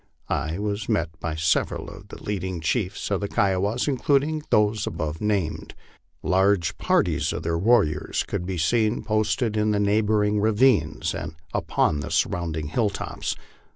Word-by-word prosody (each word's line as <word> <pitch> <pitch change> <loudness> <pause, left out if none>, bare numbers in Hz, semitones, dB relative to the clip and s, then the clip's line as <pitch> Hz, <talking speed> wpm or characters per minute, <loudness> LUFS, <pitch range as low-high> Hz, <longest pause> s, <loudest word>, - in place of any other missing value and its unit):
I 80 +3 -1
was 105 0 -3
met 85 -1 +1
by 80 -2 -3
several 80 +1 0
of - - -11
the - - -11
leading 95 -3 -3
chiefs 95 +5 -2
of 100 -1 +1
the 100 - -1
Kiowas, 100 +6 +1
including 145 +3 +1
those 105 0 +2
above 80 0 -4
named. 100 -6 -1 0.5
Large 95 -1 +2
parties - - +1
of - - -4
their 85 0 0
warriors 85 -8 +2
could - - -3
be 95 -1 -3
seen 110 +8 +1
posted 110 +1 0
in 105 0 +2
the 105 -1 +1
neighboring 105 0 +2
ravines 105 - +2
and - - -5 0.2
upon 75 - +1
the - - -5
surrounding 80 -4 -1
hilltops. 105 +4 -2
100 Hz, 150 wpm, -24 LUFS, 85-110 Hz, 0.5 s, those